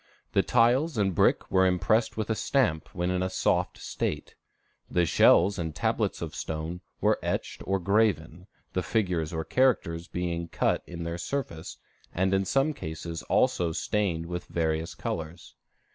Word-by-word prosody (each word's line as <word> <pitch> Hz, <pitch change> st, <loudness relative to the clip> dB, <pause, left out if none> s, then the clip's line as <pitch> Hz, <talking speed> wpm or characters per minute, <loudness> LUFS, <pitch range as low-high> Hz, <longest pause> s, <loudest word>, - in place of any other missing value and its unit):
The -, -, +5 dB
tiles 125 Hz, +5 st, +3 dB
and 100 Hz, -3 st, +2 dB
brick -, -, +2 dB
were 95 Hz, 0 st, +4 dB
impressed 110 Hz, +6 st, +1 dB
with 110 Hz, 0 st, -1 dB
a -, -, +1 dB
stamp 95 Hz, -, +1 dB
when 90 Hz, +1 st, 0 dB
in 90 Hz, 0 st, 0 dB
a 95 Hz, -, 0 dB
soft -, -, 0 dB
state; -, -, -4 dB, 0.6 s
the 90 Hz, -1 st, +2 dB
shells 95 Hz, +4 st, +5 dB
and 80 Hz, -2 st, -3 dB
tablets -, -, 0 dB
of -, -, -5 dB
stone 80 Hz, +3 st, -4 dB, 0.2 s
were -, -, +3 dB
etched -, -, -3 dB
or 95 Hz, +1 st, +2 dB
graven, 90 Hz, -3 st, +1 dB, 0.3 s
the 95 Hz, -, 0 dB
figures 90 Hz, -8 st, 0 dB
or 80 Hz, -1 st, -2 dB
characters 90 Hz, -10 st, +1 dB
being 85 Hz, -1 st, -3 dB
cut -, -, 0 dB
in 85 Hz, -1 st, -6 dB
their 85 Hz, +1 st, -4 dB
surface, 90 Hz, -9 st, -4 dB, 0.4 s
and 95 Hz, +2 st, +1 dB
in 95 Hz, 0 st, +2 dB
some 135 Hz, +9 st, +2 dB
cases 80 Hz, -, -6 dB
also 85 Hz, -2 st, +2 dB
stained 90 Hz, -4 st, -1 dB
with 90 Hz, +1 st, -5 dB
various 80 Hz, -1 st, -1 dB
colors. 80 Hz, +2 st, -5 dB
90 Hz, 160 wpm, -28 LUFS, 85-105 Hz, 0.6 s, The